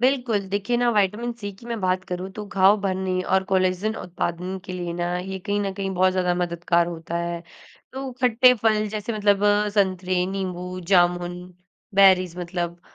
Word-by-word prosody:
बिल्कुल, 250 -5 +2
देखिए 200 +5 -1
ना 240 0 +2
विटामिन-सी 210 +1 -1
की 235 - -13
मैं 235 -2 -4
बात 185 0 0
करूँ 180 +1 -5
तो 210 0 -6
घाव 195 +1 +4
भरने 185 -1 -1
और 190 +1 +1
कोलेजन 190 +2 0
उत्पादन 180 +1 -4
के 185 - -7
लिए 175 -1 -4
ना 175 0 -1
ये 190 +1 -5
कहीं 205 +2 -2
न 195 -1 -2
कहीं 195 -1 -3
बहुत 185 +1 +3
ज़्यादा 180 -1 +1
मददगार 170 -1 +1
होता 170 0 -5
है। 170 0 -3 0.5
तो 265 0 -5
खट्टे 250 +1 +6
फल 215 -1 +1
जैसे 215 +2 -4
मतलब 205 -1 +2 0.3
संतरे, 185 -2 +1
नींबू, 185 -1 -4
जामुन, 175 -1 +2 0.6
बेरीज़ 185 -3 +5
मतलब, 175 -1 -4
190 Hz, 165 wpm, -24 LUFS, 180-205 Hz, 0.6 s, खट्टे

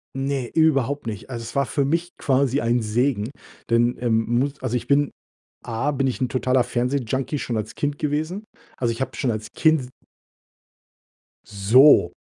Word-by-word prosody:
Ne, 135 -2 -2
überhaupt 145 -4 +2
nicht. 110 +2 -6
Also, 120 -3 -5
es 115 - -9
war 140 0 +2
für 140 +2 0
mich 165 +5 0
quasi 135 0 +1
ein 120 +1 +1
Segen, 115 +1 0 0.4
denn, 120 +1 +3
ähm, 115 -2 +1
muss 140 +1 -2
also, 125 -2 -2
ich 125 - -3
bin 145 0 +2 0.5
A 120 +6 -1
bin 135 -1 0
ich 130 - -2
'n 130 - +1
totaler 130 0 +1
Fernsehjunkie 130 +3 -1
schon 120 - -3
als 110 0 -4
Kind 145 0 -2
gewesen. 155 +7 -2 0.3
Also, 120 -2 0
ich 115 - -6
habe 130 - -3
schon 130 - 0
als 110 -1 -4
Kind 160 -1 +4
s 125 - -9 1.6
So! 105 - +5
130 Hz, 170 wpm, -23 LUFS, 115-140 Hz, 1.6 s, So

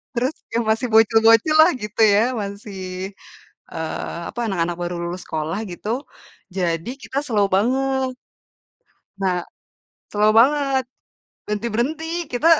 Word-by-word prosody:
terus 255 +5 0 0.2
yang 235 +1 +1
masih 225 +3 +1
bocil-bocil 225 +5 +5
lah 325 +3 +6
gitu 210 +1 -3
ya, 205 - +5 0.2
masih, 200 0 -7 0.9
eee, 160 +1 -4
apa, 240 - -6
anak-anak 175 -3 -1
baru 175 0 -2
lulus 180 +1 -6
sekolah 160 +4 -3
gitu, 175 +4 -7 0.7
jadi 170 +2 -1
kita 260 +5 -3
slow 215 -7 +2
banget. 265 +4 +1 1.1
Na 195 - +1 0.8
slow 210 +1 +3
banget. 275 0 +3 0.7
Berhenti-berhenti, 275 +11 -2
kita 245 +6 0
225 Hz, 115 wpm, -22 LUFS, 195-260 Hz, 1.1 s, lah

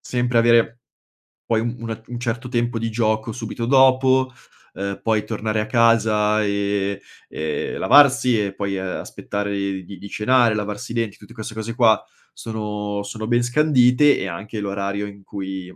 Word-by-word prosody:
sempre 120 -1 0
avere, 115 0 +3 0.7
poi, 110 -1 +3
un 120 +1 -3
una 115 -1 -5
un 120 0 -6
certo 120 +1 -3
tempo 120 -1 -1
di 115 0 -2
gioco 110 0 0
subito 115 0 -5
dopo, 130 0 +4 0.4
uhm, 100 0 -4
poi 110 -2 +1
tornare 110 0 -2
a 105 - -2
casa 110 -2 +3
e 100 -1 -1 0.3
e 75 0 -3
lavarsi 125 -5 +5
e 95 -1 -5
poi, 100 -1 -3
uhm, 95 - -4 0.2
aspettare 105 0 -4 0.3
di 95 0 -10
di 100 - -9
cenare, 120 0 +3
lavarsi 105 +3 -4
i - - -7
denti, 115 -4 -2
tutti 105 - -15
queste 110 0 -7
cose 110 +1 -5
qua 115 -3 +4 0.3
sono 105 -2 -4
sono 110 +1 -6
ben 120 0 +2
scandite 140 0 +4
e - - -3
anche 105 +5 -6
l'orario 100 0 -3
in 100 -1 -12
cui 95 -2 -6
110 Hz, 165 wpm, -21 LUFS, 100-120 Hz, 0.7 s, lavarsi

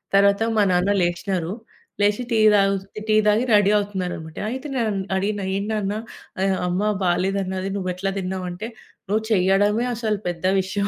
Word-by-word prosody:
తరవాత 200 +2 +4
మా 210 - +5
నాన్న 180 +3 +2
లేచినారు. 175 0 -1 0.5
లేచి 205 +4 +2
టీ 225 - +3
తగు 195 -1 +4 0.3
టీ 215 - +3
తాగి 210 +3 +4
రడీ 205 -1 +5
అవుతున్నారన్నమాట. 180 -6 -4
అయితే 265 +3 -5
నేనం 225 -5 0 0.2
అడిగిన 205 +1 -1
"ఏంటి 200 +2 -2
నాన్న 205 -2 -1 0.5
ఆహ్, 195 -1 +1
అమ్మ 180 +2 0 0.2
బాలేదన్నది. 190 +1 0
నువ్వేట్లా 185 0 -2
దిన్నావు" 185 0 -3
అంటే 215 +6 -6 0.4
"నువ్వు 215 +2 +1
చెయ్యడమే 205 +3 +3
అసలు 215 -3 -1
పెద్ద 175 0 -5 0.2
విషయం." 200 +2 -2
195 Hz, 150 wpm, -22 LUFS, 185-210 Hz, 0.5 s, మా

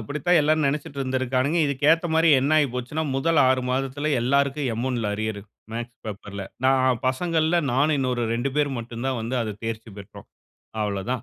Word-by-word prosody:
அப்படித்தான் 150 +9 +1
எல்லாரும் 155 +1 +2
நெனைச்சுட்டு 140 0 -3
இருந்திருக்கானுங்க. 130 +4 0
இதுக்கு 140 0 -3
ஏத்த 165 +2 +3
மாரி 160 +1 +4
என்ன 140 +4 +1
ஆயிப்போச்சுன்னா, 130 +2 -1
முதல் 160 +4 +2
6 130 -1 +2
மாதத்துல 135 +3 -1
எல்லாருக்கும் 140 +2 +1
எம் 120 +3 -2
1ல 115 -5 -1
அரியரு, 110 -1 -3 0.3
மேக்ஸ் 120 +1 -6
பேப்பர்ல. 100 -1 -6 0.2
நான் 130 -2 +3
பசங்கள்ல, 160 +4 +1
நானும் 145 +4 +2
இன்னொரு 125 -3 0
2 120 +4 -1
பேர் 145 -1 +2
மட்டும் 115 +1 -6
தான் 130 -2 -1
வந்து 115 +3 -3
அதை 110 -2 -4
தேர்ச்சி 115 0 -5
பெற்றோம். 100 - -12 0.5
அவ்வளோ 100 -2 -2
தான். 125 - -3
130 Hz, 170 wpm, -24 LUFS, 115-145 Hz, 0.5 s, மாரி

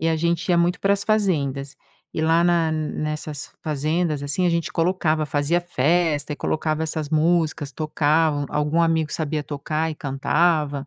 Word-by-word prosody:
E 165 - +1
a 160 - +1
gente 170 +2 -1
ia 175 - +4
muito 175 +2 +1
para 200 0 +3
as 200 0 -1
fazendas, 145 -10 0 0.4
e - - -3
lá 165 +2 +3
na 170 -2 +2
nessas 155 -1 -4
fazendas, 155 0 -1
assim, 145 +6 0
a - - +3
gente 170 -2 -1
colocava 165 -3 +1
fazia 150 +4 +1
festa 160 -1 +1
e 145 - -5
colocava 155 0 -1
essas 155 -1 -3
músicas, 160 -2 +1
tocavam 155 0 +1
algum 150 +3 0
amigo 160 -2 +1
sabia 155 -1 -2
tocar 155 +2 -2
e - - -5
cantava. 145 +1 0
155 Hz, 165 wpm, -23 LUFS, 150-170 Hz, 0.4 s, ia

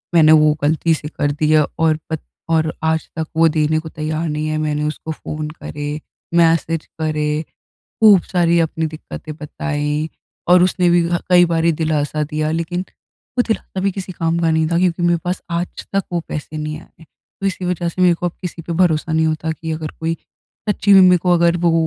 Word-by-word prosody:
मैंने 155 -2 +7
वो 155 -1 +6
ग़लती 160 +2 +2
से 150 -1 -4
कर 145 -1 -1
दिया 155 0 +3
और 160 -1 +3
पत 160 -2 -3 0.3
और 160 -1 +1
आज 160 0 0
तक 160 -1 -3
वो 165 0 +6
देने 155 0 +1
को 160 0 -8
तैयार 155 +1 -3
नहीं 155 0 -2
है 155 0 -1
मैंने 150 -1 -1
उसको 155 +1 -5
फ़ोन 155 0 -5
करे। 145 -1 -6 0.4
मैसेज 165 -1 +2
करे, 155 -1 0 0.4
ख़ूब 210 -4 +5
सारी 170 -2 +2
अपनी 160 0 0
दिक्कतें 155 0 -8
बताई 150 0 -2 0.4
और 180 0 +7
उसने 180 0 +2
भी 175 0 +4
ह 175 0 +1
कई 175 -1 +7
बारी 165 0 +2
दिलासा 155 -1 -1
दिया 155 0 -1
लेकिन 165 +2 -2 0.6
वो - - +6
दिलासा 220 -3 -2
भी 195 +1 +1
किसी 190 0 -6
काम 165 0 -1
का 165 -1 +2
नहीं 160 0 +2
था 170 - +2
क्योंकि 175 -1 +1
मेरे 175 0 +3
पास 180 +1 -2
आज 170 +1 -4
तक 195 - +2
वो 175 - 0
पैसे 150 +1 -5
नहीं 155 0 -4
आए। 165 - -19 0.4
तो 195 - -1
इसी 190 -1 -2
वजह 175 -1 -1
से 185 +2 -2
मेरे 180 -1 +5
को 175 - -3
अब 175 - -2
किसी 175 -2 -5
पे 170 - -5
भरोसा 165 -2 +1
नहीं 160 0 +2
होता 155 0 -1
कि 160 +1 -5
अगर 155 -1 -4
कोई 165 +1 0 0.5
सच्ची 205 -1 +2
में 195 - +9
मेरे 180 -1 +6
को 180 +1 +1
अगर 170 0 +3
वो 170 -1 +2
160 Hz, 205 wpm, -19 LUFS, 155-175 Hz, 0.6 s, में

